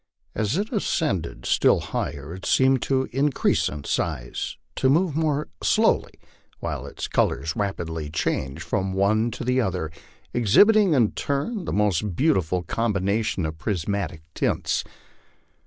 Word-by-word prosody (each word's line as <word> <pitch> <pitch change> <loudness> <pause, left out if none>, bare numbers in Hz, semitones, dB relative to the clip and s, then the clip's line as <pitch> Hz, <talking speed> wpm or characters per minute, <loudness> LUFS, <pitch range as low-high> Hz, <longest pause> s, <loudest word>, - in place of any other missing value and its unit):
As 110 - 0
it 210 +2 -2
ascended 95 - -1
Btili - - +3
higher 75 +3 -4
it 95 - -9
seemed 130 -1 +3
to 130 -1 +1
increase 135 +2 +1
in 75 -1 -7
size, 70 -6 -2 0.2
to 130 - +3
move 160 +2 +2
more 155 -2 0
slowly, - - +2 0.5
while - - -4
its - - -5
colors 70 +4 0
rapidly 80 -6 -3
changed 70 -3 -2
from 95 0 -1
one 105 +4 +2
to 120 - -6
the 125 +1 +2
other, 90 -7 -2 0.4
exhibiting 190 - +5
in 115 -6 +3
turn 175 +8 -2
the - - -3
most 105 -2 +1
beautiful 90 - +1
combinations 100 -1 0
of 80 0 -5
prismatic 90 -3 -2
tints. - - 0
105 Hz, 135 wpm, -24 LUFS, 85-135 Hz, 0.5 s, exhibiting